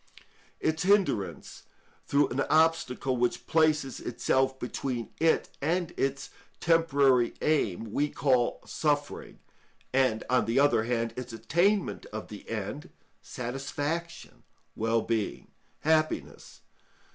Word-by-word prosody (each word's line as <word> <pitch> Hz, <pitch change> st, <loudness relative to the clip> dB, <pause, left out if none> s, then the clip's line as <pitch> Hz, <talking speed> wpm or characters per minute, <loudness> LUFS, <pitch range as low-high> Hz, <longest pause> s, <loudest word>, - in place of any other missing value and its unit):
Its 160 Hz, 0 st, 0 dB
hindrance 190 Hz, -, +1 dB, 0.5 s
through 140 Hz, 0 st, +3 dB
an 125 Hz, -, -3 dB
obstacle 155 Hz, -5 st, +2 dB
which 120 Hz, 0 st, 0 dB
places 155 Hz, -4 st, +2 dB
itself 130 Hz, +2 st, 0 dB
between 125 Hz, -1 st, -4 dB
it 165 Hz, 0 st, +2 dB
and 170 Hz, +4 st, 0 dB
its 135 Hz, 0 st, -2 dB, 0.3 s
temporary 140 Hz, -7 st, +3 dB
aim 115 Hz, -, 0 dB
we 150 Hz, +1 st, +1 dB
call 130 Hz, -5 st, +1 dB
suffering, 145 Hz, -2 st, -2 dB, 0.6 s
and, 130 Hz, -4 st, +2 dB
on 125 Hz, 0 st, +2 dB
the 115 Hz, +4 st, +1 dB
other 140 Hz, -6 st, +3 dB
hand, 115 Hz, -1 st, -1 dB
its 125 Hz, -1 st, -6 dB
attainment 175 Hz, -, 0 dB
of -, -, -7 dB
the -, -, -10 dB
end -, -, -5 dB, 0.3 s
satisfaction, 145 Hz, +7 st, -5 dB, 0.3 s
wellbeing, 115 Hz, -1 st, -1 dB, 0.3 s
happiness. 155 Hz, 0 st, -1 dB
135 Hz, 105 wpm, -28 LUFS, 120-155 Hz, 0.6 s, through